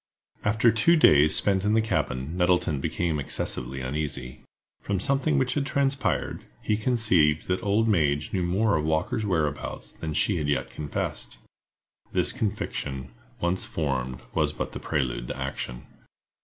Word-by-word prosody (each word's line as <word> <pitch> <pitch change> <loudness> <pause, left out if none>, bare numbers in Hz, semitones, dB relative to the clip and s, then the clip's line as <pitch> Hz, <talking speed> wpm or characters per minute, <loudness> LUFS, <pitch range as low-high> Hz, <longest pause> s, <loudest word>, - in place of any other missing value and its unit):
_ - - +2
AFTER 110 +2 +4
two 115 +11 +4
days 75 - +6
spent 95 -2 +2
in 105 +1 +2
the - - +5
cabin, 75 -9 -1
Nettleton 90 -5 +2
became 80 +1 -1
excessively 65 -1 -2
uneasy. 70 -1 -4 0.4
From 100 -2 -1
something 140 - +1
which 130 -2 +1
had 145 - 0
transpired, 135 -1 0 0.2
he 105 - 0
conceived 105 -10 +2
that 90 0 0
old 105 +3 +2
Madge 75 -8 +1
knew 95 - +1
more 95 +4 +2
of 75 - 0
Walker's 80 +7 0
whereabouts 75 -6 -2
than 80 -2 -5
she 100 +3 +2
had 75 -2 -1
yet 70 - -1
confessed. 75 -2 -4 0.8
This - - +3
conviction, 65 - -3 0.3
once 85 +2 0
formed, 65 -5 -2
was - - +1
but - - -4
the - - -6
prelude 65 -4 -2
to - - -5
action. - - -4
85 Hz, 155 wpm, -26 LUFS, 75-110 Hz, 0.8 s, days